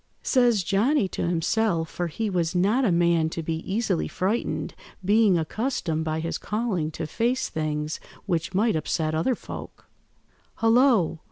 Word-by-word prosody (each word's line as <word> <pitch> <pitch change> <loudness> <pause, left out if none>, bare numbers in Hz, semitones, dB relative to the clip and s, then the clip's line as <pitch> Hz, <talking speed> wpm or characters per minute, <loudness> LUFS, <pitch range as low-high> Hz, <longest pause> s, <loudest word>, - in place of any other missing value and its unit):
Says 240 -7 +3
Johnny 210 - +2
to - - -2
himself, 170 0 +1
for 175 +1 -3
he 220 +7 -3
was 175 -3 -1
not 205 +9 +3
a 215 - +3
man 170 -2 +3
to 165 0 -5
be 160 0 -2
easily 200 -4 0
frightened, 200 +6 -2 0.3
being 205 -2 +4
accustomed 165 - -2
by 160 0 -2
his 165 +1 -3
calling 210 -8 -1
to 160 +1 -5
face 235 - 0
things 155 0 -2 0.3
which 175 -2 -2
might 215 0 +2
upset 155 0 -1
other 165 +11 +1
folk— - - -9 0.7
"'Hullo! 225 - +3
180 Hz, 150 wpm, -25 LUFS, 160-225 Hz, 0.7 s, being